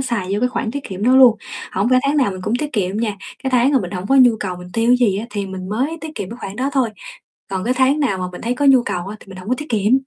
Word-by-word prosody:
xài 235 -8 -2
vô 205 - -1
cái 250 - +2
khoản 250 -2 -3
tiết 280 +3 -5
kiệm 190 0 -6
đó 255 +3 +5
luôn. 250 -4 +7 0.4
Hổng 200 +5 +1
phải 255 - +6
tháng 290 - +1
nào 260 -8 +3
mình 185 -1 -7
cũng 215 - -1
tiết 300 +1 -4
kiệm 195 -3 -1
nha. 215 -2 -1 0.3
Cái 265 - -1
tháng 255 +2 +3
mà 270 - +5
mình 180 -2 -5
hổng 185 0 -5
có 270 - +2
nhu 245 -4 +6
cầu 185 -3 -3
mình 180 0 -10
tiêu 230 +1 +1
cái 250 - +6
gì 195 0 0
á 220 - -5
thì 205 -2 -3
mình 190 -1 -7
mới 265 +10 -1
tiết 315 -1 -7
kiệm 195 -8 -5
cái 235 - -7
khoản 195 -1 -6
đó 265 +3 0
thôi. 260 -5 +1 0.6
Còn 190 -1 -2
cái 250 +3 +1
tháng 265 +3 +2
nào 225 -10 0
mà 185 - -3
mình 180 - -8
thấy 240 +2 -1
có 285 - -1
nhu 270 -3 +6
cầu 180 -5 -3
á 205 +2 -6
thì - - -16
mình 190 -1 -11
hông 185 +2 -9
có 250 - +2
tiết 300 - -6
kiệm. 215 -1 +1
230 Hz, 335 wpm, -19 LUFS, 195-260 Hz, 0.6 s, luôn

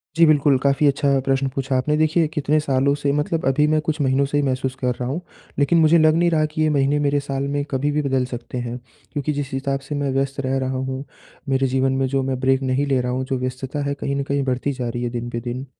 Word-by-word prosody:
जी, 165 0 +6
बिल्कुल 145 -3 +4
काफ़ी 140 +1 +3
अच्छा 140 +1 +1 0.2
प्रश्न 135 0 +1
पूछा 135 0 -2
आपने 150 +4 +1
देखिए 155 +1 +2
कितने 150 -1 0
सालों 140 -1 +1
से 140 - +1
मतलब 160 +2 -1
अभी 145 +3 +3
मैं 155 - +3
कुछ 155 +1 -2
महीनों 135 0 +2
से 145 - +1
ही 145 - +2
महसूस 130 -1 -1
कर 125 -1 0
रहा 125 - -4
हूँ। 155 +7 -3 0.4
लेकिन 145 +4 +3
मुझे 160 +1 +5
लग 155 -1 +4
नहीं 170 +1 +3
रहा 155 -1 +2
कि 155 +1 -4
ये 155 - +3
महीने 145 0 +2
मेरे 145 0 +1
साल 140 -1 -3
में 145 0 0
कभी 140 +2 0
भी 150 +1 0
बदल 135 -3 0
सकते 120 +1 -6
हैं, 120 0 -4 0.4
क्योंकि 150 0 -1
जिस 145 -1 -4
हिसाब 135 +1 -1
से 150 - -3
मैं 145 -1 -1
व्यस्त 135 +1 -1
रह 135 +1 0
रहा 130 0 -2
हूँ, 130 +1 -3 0.5
मेरे 135 0 +2
जीवन 130 +1 +1
में - - +3
जो 135 0 0
मैं 130 -1 -2
ब्रेक 130 0 +2
नहीं 130 +2 0
ले 135 -2 +2
रहा 125 0 -2
हूँ 130 +1 -2
जो 130 -1 -2
व्यस्तता 130 +3 -4
है 140 - -1
कहीं 140 0 -3
न 140 - -1
कहीं 140 0 -1
बढ़ती 130 +1 -1
जा 125 -3 -3
रही 120 +1 -4
है, 120 - -1
दिन 120 0 -4
पे 120 - -3
दिन। 125 +2 -5
135 Hz, 265 wpm, -21 LUFS, 130-145 Hz, 0.5 s, जी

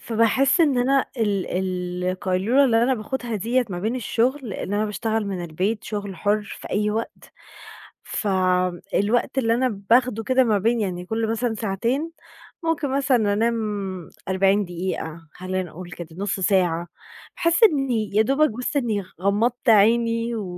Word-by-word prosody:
فباحس 235 - +2
إن 285 -6 +4
أنا 270 +2 +3
ال 185 -4 -2
القيلولة 190 +9 +2
اللي 230 -2 +3
أنا 260 +2 +3
باخدها 240 +1 -4
ديّة 240 +5 +1
ما 175 - -3
بين 220 +7 -1
الشغل 250 +4 0
لأن 200 0 -4
أنا 210 +1 +1
باشتغل 220 +1 -2
من 185 -3 -3
البيت 190 +7 -2
شغل 205 -3 -5
حر 210 +4 +1 0.2
في - - -9
أي 210 +1 +1
وقت، 225 +2 -5 0.7
ف - - -4 0.7
الوقت 240 +6 +1
اللي 230 -3 +2
أنا 255 +2 +2 0.2
باخده 245 -2 +3
كده 260 0 +3
ما 215 -4 +2
بين 230 +4 +1
يعني 180 -4 -3
كل 220 +1 -1
مثلًا 225 0 -1
ساعتين، 230 - -1 0.5
ممكن 325 -3 0
مثلًا 250 -7 +2
أنام 230 +3 +1 0.7
40 195 +2 +3
دقيقة، 170 -2 -5
خلّينا 185 +1 -3
نقول 180 +1 -10
كده، 170 -2 -7
نُص 195 +1 -2
ساعة، 180 -3 +1 0.5
باحس 340 +5 +2
إني 270 - +3
يا 215 - +5
دوبك 275 +7 +3
بس 250 +6 -4
إني 220 -6 0 0.2
غمضت 230 +6 +1
عيني 230 +2 +3
و 215 - -3
220 Hz, 155 wpm, -23 LUFS, 195-245 Hz, 0.7 s, يا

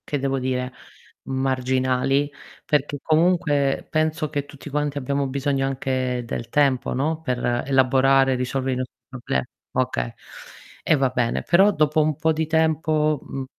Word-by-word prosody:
Che 145 - -1
devo 135 0 -1
dire, 130 0 -2 0.5
marginali 130 +1 0 0.4
perché 145 -1 0
comunque 155 -4 +2
penso 155 0 0
che 145 -2 -2
tutti 145 0 -11
quanti 145 0 -1
abbiamo 140 +1 -1
bisogno 135 0 -1
anche 130 -2 -2
del 115 0 -5
tempo, 140 -3 +2
no, 155 +5 -1
per 125 -4 -1
elaborare 135 0 +4
e - - 0
risolvere 130 +1 -1
i - - -1
nostri 130 0 -5
problemi. 120 - -3 0.3
Okay, - - -1 0.7
e - - +4
va 135 -2 +2
bene, 125 -2 -1
però 195 +4 +5
dopo 155 -3 +2
un 155 0 +1
po' 160 +2 +1
di 160 0 -1
tempo, 155 -1 +1
mhmm, 135 -1 -6
135 Hz, 150 wpm, -23 LUFS, 130-150 Hz, 0.7 s, però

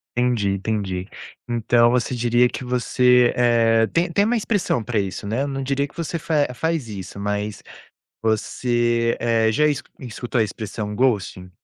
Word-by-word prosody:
Entendi, 120 -5 +1
entendi. 95 -2 -3 0.4
Então 120 0 +3
você 125 +1 0
diria 120 +1 +3
que 130 - -6
você, 125 0 +3
eh 115 -2 +3
tem 170 +1 0
tem 200 +4 +2
uma 235 +3 +1
expressão 205 - 0
para 110 -1 -1
isso, 100 0 -4
né, 120 +7 -1
não 135 -1 -4
diria 140 +1 0
que - - -24
você 170 0 -3
fa 150 -2 +1
faz 160 -1 -2
isso, 100 -1 -8
mas 105 0 -3 0.6
você, 120 +1 0
eh, 115 -1 +2
já 150 +8 +2
escu 150 -2 -1
escutou 120 0 -3
a - - +4
expressão 105 0 -5
ghosting? 100 -6 0
120 Hz, 160 wpm, -22 LUFS, 110-130 Hz, 0.6 s, a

